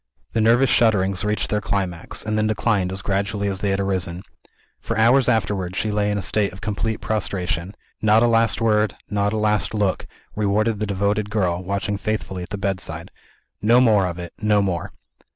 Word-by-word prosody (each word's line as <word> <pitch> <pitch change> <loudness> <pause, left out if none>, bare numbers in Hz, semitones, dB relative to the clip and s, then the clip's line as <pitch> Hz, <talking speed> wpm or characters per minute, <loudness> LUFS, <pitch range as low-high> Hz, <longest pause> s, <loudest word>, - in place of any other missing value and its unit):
The 115 - +1
nervous 120 +4 +4
shudderings 100 -4 +2
reached 105 0 -1
their 105 0 +1
climax, 95 -5 -3
and 110 - -1
then 110 0 +1
declined 105 -4 0
as 95 0 -4
gradually 100 +1 -1
as 95 -1 -2
they 100 - -1
had 95 0 0
arisen. 95 -2 -2 0.6
For - - -4
hours 125 +4 +4
afterwards, 95 -5 0
she 110 - 0
lay 105 0 +1
in 105 - 0
a 100 - -3
state 105 -2 +1
of 95 - -12
complete 110 +2 -2
prostration. 95 -3 -2 0.3
Not 110 +1 +4
a - - +5
last 115 -1 +2
word, 105 -2 +2 0.2
not 100 0 +1
a 110 - -1
last 105 -1 0
look, 100 -3 0 0.3
rewarded 105 +1 +1
the 105 - -1
devoted 100 +1 0
girl, 90 -5 0
watching 100 +2 -2
faithfully 100 -3 -3
at 90 - -7
the 105 - -4
bedside. 95 -3 -4 0.5
No 115 +4 +5
more 105 -6 +4
of 85 -1 -5
it 85 -1 -7
no 105 -1 +3
more! 90 -3 -2
105 Hz, 190 wpm, -22 LUFS, 95-110 Hz, 0.6 s, a